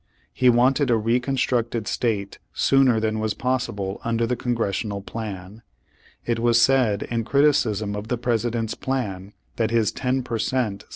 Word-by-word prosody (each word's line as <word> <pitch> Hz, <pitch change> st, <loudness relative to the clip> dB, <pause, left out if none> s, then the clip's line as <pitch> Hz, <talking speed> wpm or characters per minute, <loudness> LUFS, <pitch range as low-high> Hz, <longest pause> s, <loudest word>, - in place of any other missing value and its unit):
He 125 Hz, -, +4 dB
wanted 130 Hz, +4 st, +3 dB
a 115 Hz, -, +4 dB
reconstructed 120 Hz, -1 st, 0 dB
state 105 Hz, -5 st, -2 dB
sooner 135 Hz, -4 st, +3 dB
than 110 Hz, 0 st, -1 dB
was 110 Hz, -1 st, -1 dB
possible 120 Hz, -7 st, -2 dB
under 115 Hz, 0 st, 0 dB
the 125 Hz, +2 st, -1 dB
Con 120 Hz, 0 st, -2 dB
gressional 100 Hz, -2 st, -2 dB
plan. 105 Hz, -1 st, -7 dB, 0.6 s
It 120 Hz, -1 st, 0 dB
was 120 Hz, 0 st, +3 dB
said 120 Hz, -5 st, +3 dB
in 115 Hz, -1 st, -2 dB
criticism 110 Hz, -7 st, +2 dB
of 105 Hz, +1 st, -6 dB
the 125 Hz, -, -1 dB
President's 115 Hz, -1 st, -1 dB
plan 105 Hz, -7 st, -4 dB, 0.2 s
that 110 Hz, -2 st, +1 dB
his 115 Hz, -2 st, +2 dB
"ten 130 Hz, 0 st, -1 dB
per 115 Hz, -2 st, -3 dB
cent." 110 Hz, -5 st, -1 dB
115 Hz, 155 wpm, -23 LUFS, 105-125 Hz, 0.6 s, He